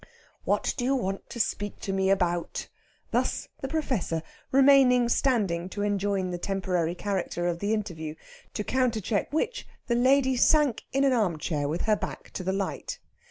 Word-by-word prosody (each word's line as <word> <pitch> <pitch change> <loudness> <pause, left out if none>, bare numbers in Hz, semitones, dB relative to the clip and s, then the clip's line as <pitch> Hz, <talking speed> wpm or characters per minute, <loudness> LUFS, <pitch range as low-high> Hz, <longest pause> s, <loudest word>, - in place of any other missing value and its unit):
"What - - +1
do 245 - -1
you 270 +2 +2
want 195 -6 -3
to 235 - -7
speak 205 -2 -2
to 195 - -3
me 190 0 +1
about?" 175 -3 0 0.4
Thus - - 0
the 270 - -2
Professor, 255 - -1 0.3
remaining 265 -3 +6
standing 200 -10 +1
to 205 +1 -3
enjoin 200 -2 0
the 175 - -4
temporary 180 -3 -1
character 185 -3 -2
of 170 -1 -1
the 205 +3 -1
interview; 170 -8 -3 0.4
to 210 - -1
countercheck 225 -5 0
which 400 +11 -1 0.2
the 240 - 0
lady 260 +2 +4
sank 295 -3 +3
in 275 +1 +2
an 270 -2 +4
armchair 165 -9 0
with 160 +4 -2
her 215 -1 +3
back - - -6
to 185 - -5
the 190 - 0
light. 195 0 -3
205 Hz, 165 wpm, -27 LUFS, 180-255 Hz, 0.4 s, remaining